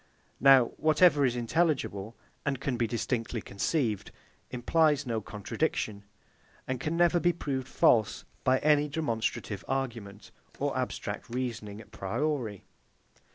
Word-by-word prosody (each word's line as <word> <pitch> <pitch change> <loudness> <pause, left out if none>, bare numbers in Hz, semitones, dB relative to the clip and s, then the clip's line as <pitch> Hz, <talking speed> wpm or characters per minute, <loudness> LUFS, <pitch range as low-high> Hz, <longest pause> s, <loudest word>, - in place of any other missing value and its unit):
Now 135 -1 +7
whatever 155 -2 +4
is 125 -2 +1
intelligible, 120 - 0 0.3
and 140 -3 -1
can 135 -2 -2
be 120 -1 0
distinctly 115 +1 -2
conceived, 110 - -1 0.4
implies 145 +3 +2
no 115 -3 -2
contradiction, 105 0 -3 0.6
and 130 -1 -2
can 155 +5 -2
never 175 0 +4
be 175 +1 +3
proved 135 -5 -3
false 110 -5 +2 0.2
by 130 0 +4
any 150 -1 +4
demonstrative 115 -8 -2
argument 115 -7 -4 0.3
or - - -1
abstract - - -4
reasoning 115 -4 -4
à - - -17
priori. 115 0 -2
125 Hz, 120 wpm, -29 LUFS, 110-150 Hz, 0.6 s, Now